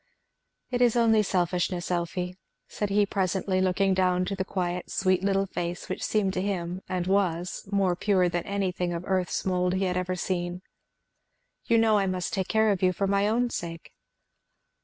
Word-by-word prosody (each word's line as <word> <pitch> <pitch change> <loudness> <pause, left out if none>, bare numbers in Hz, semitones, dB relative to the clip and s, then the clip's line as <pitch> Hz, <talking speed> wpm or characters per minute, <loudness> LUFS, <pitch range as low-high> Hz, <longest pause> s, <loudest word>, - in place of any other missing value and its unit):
"It 245 0 0
is 245 -2 +4
only 225 -2 +4
selfishness, 180 -2 -1
Elfie," 180 +1 -2 0.3
said 210 - -3
he 205 +1 +3
presently, 190 -1 0
looking 190 +1 +2
down 185 -1 +2
to 195 - -3
the 190 - -1
quiet 180 -2 -3
sweet 185 -1 +1
little 195 0 +2
face 175 -2 -4
which - - -4
seemed 200 -3 +1
to 185 - -1
him, 185 -2 -3
and 180 -1 -1
was, 185 -1 0
more 195 -3 +2
pure 185 -1 +2
than 175 0 -1
anything 180 -3 -1
of 170 0 -4
earth's 185 -2 -1
mould 180 -1 +1
he 190 - 0
had 180 -1 0
ever 185 0 -1
seen. 175 0 -3 1.0
"You 230 - +3
know 220 -2 +4
I 195 - +1
must 185 -1 -2
take 190 -2 -1
care 220 -1 +3
of 195 - -1
you 185 -1 +3
for 195 - -1
my 200 +1 +2
own 240 +3 +1
sake." 165 -1 -6
185 Hz, 180 wpm, -27 LUFS, 180-200 Hz, 1.0 s, is